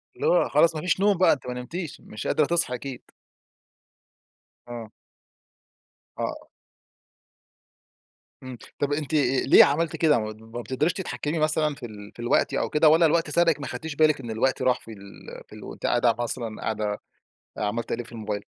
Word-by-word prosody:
اللي 460 - -2
هو - - +3
خلاص 165 -1 +4
ما 155 - -3
فيش 180 0 0
نوم 200 -2 +3
بقى 185 - +5
أنتِ 130 -3 -7
ما 125 - -3
نمتيش 155 +7 -6
مش 105 - -7
قادرة 155 - +2
تصحي 170 -6 +1
أكيد. 130 +1 -8 1.6
آه. 115 -2 -8 1.3
آه. - - -4 2.0
إمم، 130 -1 -8 0.2
طب 145 0 0
أنتِ 150 0 -3 0.3
ليه - - +9
عملتِ 155 +3 0
كده 150 -6 +3
ما 110 +2 -7
بتقدريش 130 +9 0
تتحكمي 170 -4 -3
مثلًا 155 -1 +1
في 125 - -9
ال 105 -2 -10
في - - -19
الوقت 120 - +1
أو - - 0
كده 155 +1 +4
والّا 165 +2 +5
الوقت 165 0 +2
سَرَقِك 165 0 +2
ما 140 - -5
اخدتيش 145 +5 -6
بالِك 155 -1 +3
إن 120 -4 -6
الوقت 130 +5 0
راح 130 -1 +2
في 115 - -12
ال 100 -1 -12
في - - -16
ال - - -11
وأنتِ - - -8
قاعدة 120 -1 +3
مثلًا 120 -2 -4
قاعدة 105 -1 -2 0.6
عمّالة 105 +2 -1
تقلبي 120 - -3
في - - -15
الموبايل؟ 105 -3 -4
130 Hz, 170 wpm, -25 LUFS, 115-155 Hz, 2.0 s, ليه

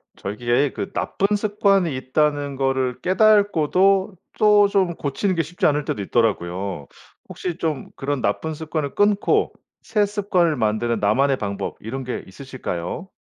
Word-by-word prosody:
저기에 120 +7 0
그 195 - -5
나쁜 200 +2 0
습관이 200 -6 +1
있다는 145 +1 0
거를 130 -2 0
깨닫고도 195 -1 +3 0.2
또 210 -1 +5
좀 190 -4 +1
고치는 180 +7 -1
게 165 - +1
쉽지 175 +4 -3
않을 150 -1 +2
때도 105 - -3
있더라고요. 95 - -1 0.4
혹시 175 -2 -5
좀 155 -6 -2
그런 140 -1 -2
나쁜 160 +10 -1
습관을 155 -2 -4
끊고 205 0 +2 0.3
새 210 -2 +1
습관을 195 -5 +1
만드는 110 +1 0
나만의 135 +7 +2
방법 100 -3 -4
이런 130 +5 -5
게 125 -1 -4
있으실까요? 110 - -6
150 Hz, 305 characters per minute, -22 LUFS, 125-195 Hz, 0.4 s, 또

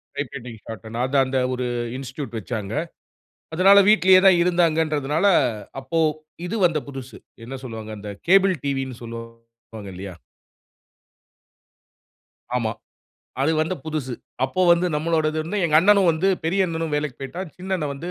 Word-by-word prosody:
Type 140 -2 -3
writing, 120 -3 -8
ஷார்ட்ஹேன்ட்னு 110 +1 -6
அது 130 +2 -3
அந்த 130 +1 -2 0.2
ஒரு 125 0 -2 0.3
இன்ஸ்டிடியூட் 130 -2 -6
வச்சாங்க. 105 -1 -5 0.8
அதனால 195 +4 +7
வீட்டிலேயே 190 -2 +6
தான் 185 -2 +6
இருந்தாங்கறதுனால, 160 -2 +1 0.6
அப்போ 150 +6 -2 0.5
இது 200 - -3
வந்த 165 -3 +2
புதுசு. 135 -2 -9 0.3
என்ன 135 +3 -6
சொல்லுவாங்க? 110 -3 -7
அந்த 105 0 -7 0.2
கேபிள் 195 0 +5
டிவின்னு 135 -3 -2
சொல்லுவாங்க 115 -2 -10
இல்லையா? 95 0 -7 2.4
ஆமா. 115 -3 -1 0.7
அது 155 +4 +2
வந்த 160 +4 0
புதுசு. 150 -5 -3 0.3
அப்போ 135 +8 -2
வந்து 170 +1 +2
நம்பளோடது 155 0 0
வந்து 205 +6 -3
எங்க 155 -2 +3
அண்ணனும் 200 0 +5
வந்து 165 +4 +1 0.2
பெரிய 190 +4 +2
அண்ணனும் 165 -2 -3
வேலைக்கு 150 -3 -3
போயிட்டான். 170 +6 -6
சின்ன 185 +1 -6
அண்ணன் 150 -5 -3
வந்து 170 +6 -6
150 Hz, 135 wpm, -23 LUFS, 120-170 Hz, 2.4 s, அதனால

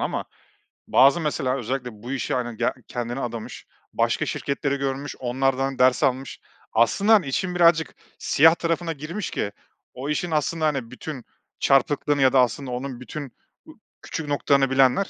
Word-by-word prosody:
ama - - -2 0.6
bazı 135 +6 +5
mesela 135 -4 -1
özellikle 125 +1 -3
bu 125 - -6
işe, 135 - -2
hani, 120 -3 -2
ge - - +1
kendini 120 +1 -4
adamış 115 -4 -6 0.3
başka - - +1
şirketleri 140 0 -2
görmüş, 140 +1 -3
onlardan 135 +1 -1
ders 130 +3 +4
almış. 130 -1 -1 0.3
Aslında, 195 - +3
hani, 205 -7 +5
işin 180 +7 -2
birazcık 170 -2 +3 0.2
siyah 160 +3 +5
tarafına 165 0 -1
girmiş 165 +7 -5
ki 100 - -2 0.4
o 135 +4 -6
işin 165 +3 -1
aslında, 155 +1 0
hani, 135 -6 -1
bütün 130 0 -7 0.3
çarpıklığını 145 +1 +2
ya 130 0 +4
da 130 - +5
aslında 125 +1 0
onun 125 0 -5
bütün 140 +1 -7 0.3
u - - -13 0.3
küçük 160 - -5
noktalarını 140 -1 +2
bilenler, 135 +8 +3
135 Hz, 155 wpm, -24 LUFS, 125-155 Hz, 0.6 s, bazı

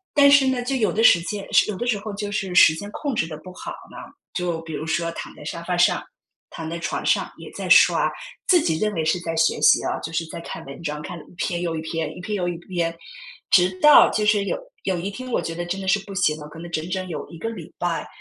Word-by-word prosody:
但 280 -1 +7
是 280 -2 +6
呢， 255 -2 0
就 270 +2 -1
有 225 -5 +1
的 225 - 0
时 170 - +7
间 200 +2 -5
是 - - +5
有 195 - -3
的 240 - -3
时 220 -4 +1
候 215 +1 -6
就 205 0 -4
是 195 -4 -3
时 155 - +8
间 205 +6 -7
控 285 +2 -3
制 160 -7 0
得 155 -2 -7
不 180 +3 -12
好 - - -8 0.2
呢， - - -11 0.4
就 175 -2 -2
比 160 -1 -8
如 155 +2 -4
说 170 +1 0
躺 - - -7
在 - - -12
沙 170 - -5
发 175 +1 -2
上、 175 - +3 0.5
躺 160 -1 -7
在 170 0 -4
床 170 - -3
上 - - +1
也 - - -10
在 - - -6
刷。 - - +6 0.4
自 355 -3 +6
己 160 - 0
认 210 +2 0
为 160 - -1
是 160 +3 +1
在 165 -1 -4
学 160 0 +2
习 - - +5
啊， - - -2
就 160 - -6
是 165 0 -1
在 - - -7
看 165 -1 -8
文 140 +4 -10
章， 150 -2 -4
看 170 +2 -7
了 - - -12
一 - - -19
篇 175 -3 -2
又 170 -2 -2
一 160 - -3
篇， 160 -1 -4
一 - - -8
篇 210 - -4
又 180 -2 -1
一 175 - -2
篇。 170 -1 -3 0.6
直 180 0 +6
到 300 0 +8
就 215 - 0
是 210 -1 +3
有 - - -1 0.3
有 185 - 0
一 185 +4 -3
天 255 +5 -7
我 - - 0
觉 165 - -4
得 175 +1 -4
真 190 +3 -3
的 - - -6
是 205 +2 +3
不 195 - -7
行 155 -5 +2
了， 150 - -9
可 150 +2 -13
能 170 +1 -9
整 160 +2 -3
整 185 0 -2
有 160 - -5
一 165 - -10
个 225 - -3
礼 180 -9 -9
拜， 175 -1 -2
175 Hz, 305 characters per minute, -23 LUFS, 165-205 Hz, 0.6 s, 时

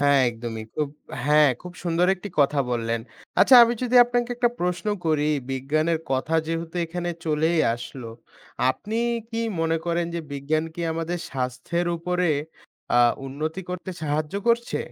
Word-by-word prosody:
হ্যাঁ 140 -1 +5
একদমই 115 -1 -6
খুব 150 -2 -1 0.4
হ্যাঁ 150 0 +5
খুব 180 - -8
সুন্দর 170 +1 +2
একটি 195 +2 -8
কথা 140 +1 +3
বললেন। 115 -1 -1 0.4
আচ্ছা 265 - +7
আমি 235 - 0
যদি 250 0 +2
আপনাকে 245 0 -1
একটা 240 0 +3
প্রশ্ন 180 +1 -1 0.2
করি 150 -2 +2 0.2
বিজ্ঞানের 155 +5 0
কথা 135 +4 0
যেহেতু 165 +1 -4
এখানে 175 +1 -3
চলেই 160 +1 +1 0.2
আসল 120 +2 -8 0.7
আপনি 210 +10 -5 0.3
কি 225 - -3 0.2
মনে 165 0 +1
করেন 170 0 0
যে 170 - -1
বিজ্ঞান 150 +3 -1
কি 175 - -6
আমাদের 165 +2 -3
স্বাস্থ্যের 135 +7 -2
উপরে 180 +1 0 0.7
আ - - +7 0.3
উন্নতি 155 +6 -4
করতে 180 0 -5
সাহায্য 150 +2 -1
করছে? 235 0 +1
160 Hz, 150 wpm, -24 LUFS, 140-180 Hz, 0.7 s, আচ্ছা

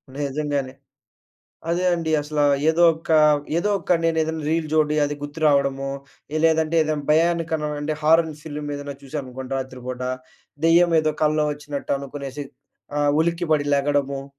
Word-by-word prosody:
నిజంగానే. 140 -2 -2 1.0
అదే 180 +2 0
అండి 165 -2 -2
అసల. 150 0 -4 0.3
ఏదో 170 +2 +3
ఒక 160 +1 -14 0.5
ఏదో 205 +4 0
ఒక 175 - +1
నేనేదైనా 160 -1 0
రీల్ 160 -1 0
జోడీ 150 -1 +2
అది 145 0 -3
గుర్తురావడము. 140 -2 +1 0.6
లేదంటే 160 0 +2
ఏదైనా 150 -1 -2
భయానక 165 0 +2 0.3
అంటే 150 +1 -2
హారన్ 160 0 +3
సిల్మ్ 150 -1 -6
ఏదన్నచూసాననుకోండి 135 -2 -7
రాత్రి 130 -1 -6
పూట, 130 0 -5 0.6
దెయ్యం 170 +1 +5
ఏదో 155 -1 0
కల్లో 155 0 +2
వచ్చినట్టు 145 -1 -4
అనుకునేసి 140 0 -7 0.5
ఆహ్, 145 0 +2
ఉలిక్కిపడి 160 -3 0
లెగడము 140 -1 0
150 Hz, 125 wpm, -22 LUFS, 140-160 Hz, 1.0 s, దెయ్యం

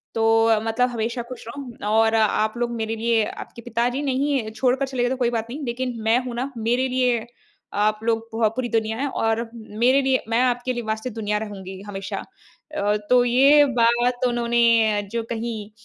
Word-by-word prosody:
तो 225 - +1 0.2
अ, 220 -1 +4
मतलब 240 +3 +1
हमेशा 235 +1 -2
ख़ुश 255 -3 -9
रहो 240 -4 -6
और 225 0 +4
आप 215 0 +2
लोग 240 0 -1
मेरे 225 0 -2
लिए 230 -1 +2
आपके 235 - -8
पिताजी 240 +3 -1
नहीं 275 +1 0
है 220 -2 -5
छोड़ 250 +3 +1
कर 275 +1 -1
चले 260 -2 -2
गए 245 - +2
तो 265 - -1
कोई 245 -2 +1
बात 230 -1 -2
नहीं 285 +4 -6
लेकिन 250 +1 -3
मैं 225 +2 +4
हूँ 245 -2 -5
ना 260 +3 -3
मेरे 240 +4 +1
लिए 250 -3 +1 0.6
आप 215 0 0
लोग 225 0 -1
पोह 225 -1 +2
पूरी 250 -2 -1
दुनिया 220 -1 0
है 280 - -1
और 225 0 -1
मेरे 235 +4 +1
लिए 265 -1 +1
मैं 230 +1 +2
आपके 250 0 0
लिए 240 - -4
वास्ते 220 +3 -3
दुनिया 210 -1 -2
रहूँगी 190 -2 -8
हमेशा। 195 -1 -5 0.5
अ, 210 -4 +1
तो 250 -1 +5
ये 275 +5 +6 0.2
बात 240 +2 +2
उन्होंने 235 0 +1 0.5
जो 230 -1 -2
कही 225 -2 -4
235 Hz, 195 wpm, -23 LUFS, 225-250 Hz, 0.6 s, ये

